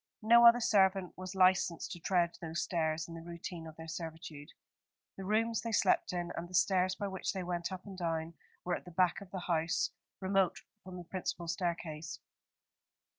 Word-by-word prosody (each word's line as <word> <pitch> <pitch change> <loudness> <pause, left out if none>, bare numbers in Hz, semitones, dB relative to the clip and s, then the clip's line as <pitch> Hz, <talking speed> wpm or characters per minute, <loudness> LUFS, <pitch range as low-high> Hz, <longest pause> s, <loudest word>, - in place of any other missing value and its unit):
No 235 +2 +8
other 235 +1 +7
servant 195 -4 +3
was 185 +1 -7
licensed 185 -2 +3
to 175 - -6
tread 175 -1 +1
those 165 0 -2
stairs 160 -2 -1
in 170 - -9
the 165 - -7
routine 170 0 -7
of 160 - -10
their 160 0 -9
servitude. 160 -3 -7 0.7
The 195 - -7
rooms 225 +2 +1
they 230 - -3
slept 215 - +3
in, 175 -1 -3
and 175 +1 -5
the 185 - -6
stairs 185 0 +3
by 205 - -3
which 190 -1 -3
they 190 -2 -3
went 175 0 -2
up 185 -1 -6
and 200 -2 -8
down, 165 -1 -2 0.3
were 180 - 0
at - - -8
the - - -9
back 180 +2 +2
of 200 - -11
the 190 -1 -5
house, 170 +1 0 0.3
remote 190 -1 +1 0.2
from 185 0 -8
the 175 - -7
principal 175 -1 -4
staircase. 165 -2 -3
180 Hz, 190 wpm, -33 LUFS, 165-190 Hz, 0.7 s, No